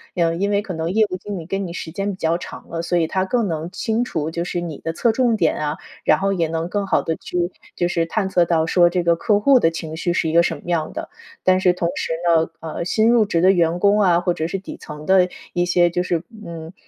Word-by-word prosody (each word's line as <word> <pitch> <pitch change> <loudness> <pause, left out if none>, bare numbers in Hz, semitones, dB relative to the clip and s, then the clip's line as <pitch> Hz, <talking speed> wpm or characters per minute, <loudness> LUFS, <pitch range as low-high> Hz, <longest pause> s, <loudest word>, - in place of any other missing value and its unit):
呃， 165 -2 +1
因 200 +4 0
为 200 0 +2
可 205 -3 -6
能 165 +1 -2
业 220 +3 +4
务 - - -3
经 200 +2 -6
理 165 - -8
跟 195 +3 -2
你 - - -7
时 170 - -6
间 195 +4 -2
比 190 - -8
较 165 -1 +1
长 - - -10
了， 165 - -3
所 175 +1 0
以 165 -2 +2
他 185 +3 0
更 230 +2 0
能 160 -1 -3
清 220 +4 -1
楚， 160 -10 -3
就 170 +1 -3
是 175 0 -3
你 165 -4 -5
的 165 - -3
侧 230 +7 +2
重 240 -1 +2
点 165 -6 +2
啊， 150 0 -2 0.3
然 155 - +3
后 195 0 +1
也 170 -4 0
能 165 +1 -2
更 200 +1 -1
好 - - +2
地 160 - -2
去， 175 +1 -2 0.3
就 175 - +1
是 170 -1 0
探 195 +4 -1
测 180 -2 +3
到 165 -1 +1
说 175 +1 +4
这 175 0 -1
个 170 0 +3
客 205 +4 +2
户 270 +5 +5
的 165 - +3
情 160 -1 -6
绪 175 - -1
是 170 - 0
一 - - -3
个 170 +1 +6
什 - - -1
么 - - -16
样 170 -3 -1
的。 - - -6 0.3
但 185 0 +4
是 185 - +5
同 175 -1 -1
时 - - -3 0.3
呢， 160 0 0
呃， 165 +1 -5
新 220 +5 +2
入 235 -2 +4
职 170 -5 0
的 185 +2 +6
员 170 -1 +1
工 205 +2 +4
啊， 175 -4 +4
或 175 0 0
者 160 -1 -2
是 185 - -3
底 195 - -8
层 150 0 -9
的 185 0 +4 0.2
一 175 0 +1
些 175 -1 +3
就 175 +1 -1
是 175 -2 -1 0.2
嗯， 165 0 -8
175 Hz, 300 characters per minute, -21 LUFS, 165-195 Hz, 0.3 s, 个